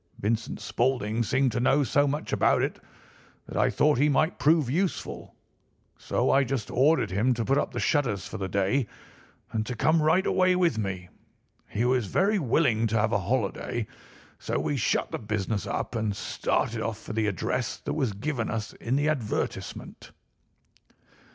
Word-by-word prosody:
Vincent 110 +3 -2
Spaulding 115 0 0
seemed 130 +3 +1
to 120 - -2
know 135 +4 +3
so 145 +3 +2
much 145 +2 -3
about - - +3
it - - -2 0.7
that - - -9
I - - +3
thought 150 -3 +2
he 150 +2 +4
might 155 +4 +1
prove 155 -2 +3
useful, 175 +8 -2 0.6
so - - 0
I 140 - +4
just 130 -4 -3
ordered 145 +2 +3
him 115 +7 +2
to 115 -1 -2
put 135 +1 +2
up - - -2
the - - -4
shutters 120 -10 0
for - - -7
the 95 - -2
day 100 +7 +1 0.6
and 110 - -1
to 125 - -3
come 155 +7 +3
right 160 +5 +3
away 185 -1 +3
with 170 -11 +2
me. 95 -3 -4 0.6
He 115 +4 -1
was 125 -4 +1
very 200 - +2
willing 120 -6 +2
to 110 +1 0
have 110 +1 +1
a 105 - +2
holiday, 110 +2 -2 0.5
so - - -2
we 145 - -1
shut 120 - 0
the - - -3
business 105 -1 -2
up - - -3
and 110 -3 -1
started 110 +2 -1
off 110 -1 -2
for 110 - -8
the 110 -1 0
address 110 +5 -2
that - - -4
was 135 -8 0
given 115 +2 -3
us 110 0 -4
in 120 +3 -2
the 145 +2 +1
advertisement. 130 -9 -3
120 Hz, 175 wpm, -27 LUFS, 110-145 Hz, 0.7 s, he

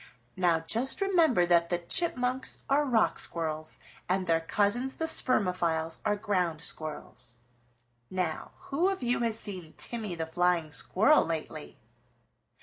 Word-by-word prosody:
Now 175 -3 +2
just 230 +11 0
remember 335 - +3
that 170 -1 +3
the 175 - +1
Chipmunks 250 - 0
are 290 +2 +2
Rock 240 -5 +2
Squirrels 155 -2 -4 0.3
and 185 0 +1
their 165 -1 +2
cousins 210 +9 0
the 320 - -2
Spermophiles 180 - +1
are 210 -1 +1
Ground 185 -7 -1
Squirrels. 150 -7 -4 0.7
Now 180 -4 -3 0.2
who 335 +8 +2
of 390 -8 -3
you 245 0 +1
has 230 -2 0
seen 180 -6 -8
Timmy 220 -6 -3
the 165 -1 -3
Flying 175 -1 0
Squirrel 220 - +4
lately?" 155 -3 -5
185 Hz, 135 wpm, -29 LUFS, 165-245 Hz, 0.7 s, Squirrel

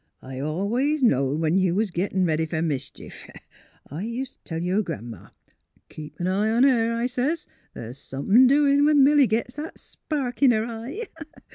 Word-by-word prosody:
*' - - -50
I 130 0 -8
always 225 - -1
knowed 140 - +2
when 165 +4 +2
you 185 -2 +1
was 210 -1 0
gittin' 185 +1 -1
ready 160 -1 0
fer 160 0 -2
mischief. 140 -4 -6 0.6
I 155 +7 -7
ust' 245 +3 -6
t' - - -14
tell 165 -1 -3
yer 180 +5 0
Gran 120 - -6
'ma, 105 - -13 0.3
' - - -40
Keep 150 -1 -11
an 175 - -2
eye 195 +4 +1
on 230 +3 +3
her,' 230 -4 +3
I 235 +1 -1
sez, 260 +6 -1 0.2
' - - -39
th's 120 +4 -8
somethin' 200 - +3
doin' 280 +1 +4
when 295 -2 +5
Milly 285 -1 +5
gits 230 +4 -2
that 310 +2 -7
spark 270 -6 -5
in 275 - +6
her 220 -2 +2
eye.' 235 - -6
220 Hz, 195 wpm, -24 LUFS, 160-260 Hz, 0.6 s, in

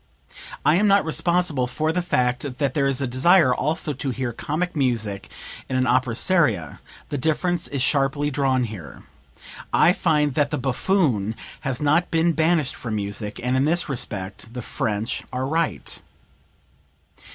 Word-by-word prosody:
I 155 - +5
am 210 +2 +3
not 200 -2 +4
responsible 160 -5 +1
for 155 +5 -1
the 180 +2 0
fact 125 -4 -1
that 140 -1 0
there 140 -2 +1
is 135 -1 0
a - - +1
desire 130 +3 +4
also 155 +2 -1
to 135 +1 -3
hear 130 -1 -3
comic 170 +9 -3
music 115 -8 -1 0.4
in 130 - -2
an 130 0 +2
opera 125 -1 +1
seria; 115 - +1 0.3
the 145 - -2
difference 170 +4 0
is 140 -3 -2
sharply 145 +1 +1
drawn 130 -2 +1
here. 90 - -8 0.7
I 175 - +5
find 150 -6 +1
that 145 +1 +1
the - - -2
buffoon 130 - 0 0.2
has 130 -3 -3
not 150 +4 +2
been 165 +1 +2
banished 160 -2 +1
from 115 -3 -4
music, 105 +1 -4
and 125 +1 +1
in 130 +2 +2
this 170 +3 +2
respect 105 -4 -4
the 125 - -5
French 110 -3 -2
are 130 +1 -2
right." 160 +3 -2
135 Hz, 160 wpm, -23 LUFS, 125-160 Hz, 0.7 s, I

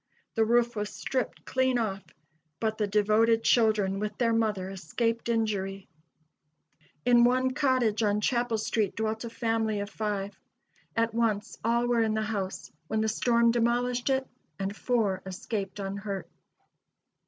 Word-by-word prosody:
The 225 - +3
roof 240 +1 +2
was 210 -1 -2
stripped 260 -2 -3
clean 260 -1 +1
off, 200 -4 -1 0.6
but 220 -1 -1
the 210 - +1
devoted 215 +2 +3
children 210 -4 +3
with 210 0 -3
their 230 -2 +2
mother 215 -4 0
escaped 230 +6 -2
injury. 200 -4 -1 1.2
In 240 -1 +6
one 255 +1 +3
cottage 255 -6 +1
on 210 -1 +2
Chapel 240 0 +1
street 215 -2 -1
dwelt 220 +1 -2
a - - -5
family 225 -2 -1
of 200 +1 -5
five. 205 -2 -3 0.6
At 230 0 +1
once 225 -3 -1
all 235 +2 +2
were 240 -1 +2
in 220 -1 +1
the 220 - 0
house, 200 -3 -4 0.2
when 220 +3 0
the 220 - +1
storm 235 +1 +3
demolished 240 +2 +1
it, 265 0 +1 0.3
and 195 +1 -3
four 215 -6 0
escaped 195 +1 -4
unhurt. 200 0 -4
220 Hz, 145 wpm, -28 LUFS, 205-235 Hz, 1.2 s, In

